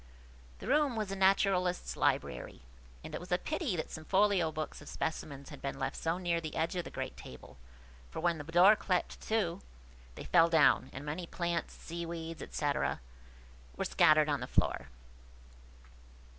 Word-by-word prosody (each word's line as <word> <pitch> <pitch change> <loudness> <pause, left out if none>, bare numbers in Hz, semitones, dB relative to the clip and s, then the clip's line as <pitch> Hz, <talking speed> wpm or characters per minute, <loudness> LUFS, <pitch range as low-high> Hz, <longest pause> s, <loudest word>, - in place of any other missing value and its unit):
The - - -9
room 285 -1 +3
was 215 -3 -2
a - - -2
naturalist's 190 -2 +2
library, 60 0 -1 0.4
and - - -8
it - - -3
was 180 +1 -11
a 180 - +4
pity 300 - -2
that 160 - -4
some 160 - -7
folio 190 -2 +3
books 155 -1 -5
of 145 - -10
specimens 140 -3 -4
had 145 - -10
been 140 0 -4
left 135 0 -2
so 165 +2 -1
near 175 -2 0
the 155 -2 -6
edge 165 +2 0
of 175 -2 -2
the - - -6
great - - -5
table, 65 0 -12 0.5
for, - - -6
when 170 -2 +1
the - - -5
door 175 +6 +6
clapt 185 -4 -1
to, 200 -5 0 0.5
they - - -7
fell 165 -1 +5
down, 155 -5 +4
and 135 - -8
many 165 +4 -4
plants, 170 0 -2
sea 170 0 -6
weeds, 165 -1 -6
&c., 145 -1 0 1.0
were - - -2
scattered 155 0 +5
on 145 -2 0
the 125 - -5
floor. - - +1
170 Hz, 175 wpm, -32 LUFS, 155-185 Hz, 1.0 s, door